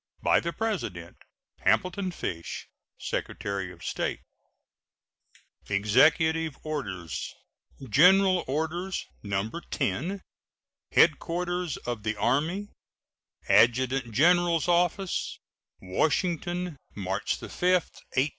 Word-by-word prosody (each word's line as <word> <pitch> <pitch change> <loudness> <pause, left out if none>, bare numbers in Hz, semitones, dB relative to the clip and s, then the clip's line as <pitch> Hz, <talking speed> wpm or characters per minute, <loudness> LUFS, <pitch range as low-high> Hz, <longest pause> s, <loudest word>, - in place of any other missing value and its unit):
By - - +5
the 170 - -3
President: 140 - -3 0.4
HAMILTON 185 +1 +1
FISH, 85 - -5 0.3
Secretary 100 -2 -3
of 85 -1 -14
State. - - -2 1.5
EXECUTIVE 155 +10 +3
ORDERS. 100 - -4 0.5
GENERAL 185 - +5
ORDERS, 160 +7 -2 0.2
No. 100 0 -1 0.2
10. 175 +7 -2 0.7
HEADQUARTERS 175 -1 +2
OF 120 -3 -3
THE 110 +1 -2
ARMY, 160 - 0 0.8
ADJUTANT 125 +1 +3
GENERAL'S 170 +5 +3
OFFICE, 175 +2 +1 0.4
Washington, 175 - -1 0.2
March 95 -1 -2
5, - - -12
1869. 175 -6 0
155 Hz, 80 wpm, -28 LUFS, 110-180 Hz, 1.5 s, By